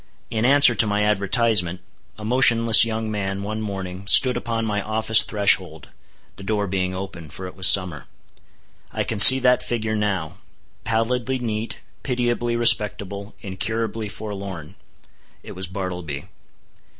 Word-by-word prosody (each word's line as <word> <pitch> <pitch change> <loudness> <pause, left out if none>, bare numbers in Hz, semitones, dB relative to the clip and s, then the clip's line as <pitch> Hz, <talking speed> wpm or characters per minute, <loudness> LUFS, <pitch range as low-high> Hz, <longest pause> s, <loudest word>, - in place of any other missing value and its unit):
In 110 +1 -2
answer 140 -1 +5
to 115 - +1
my 105 0 -1
advertisement, 105 -3 0 0.4
a 105 - -9
motionless 115 -2 +5
young 110 -1 -5
man 100 -1 -4
one 110 +2 -5
morning, 95 -2 -7
stood 130 +5 +4
upon 115 -1 -4
my 105 -1 -3
office 110 +1 +3
threshold, 95 -7 -2 0.5
the 100 - -9
door 105 +1 -2
being 95 -1 -3
open, 90 -4 -9
for 95 +5 -10
it 90 - -10
was 95 -1 +2
summer. 90 -6 +3 0.8
I - - -3
can 110 - -4
see 130 +6 +11
that 125 0 +2
figure 110 -2 -4
now—pallidly 110 - -4
neat, 115 -2 -6 0.2
pitiably 120 -2 -2
respectable, 105 -3 0
incurably 110 +2 -5
forlorn! 100 -6 -9 0.7
It - - -11
was 95 0 -6
Bartleby. 90 -6 -7
105 Hz, 135 wpm, -21 LUFS, 95-115 Hz, 0.8 s, see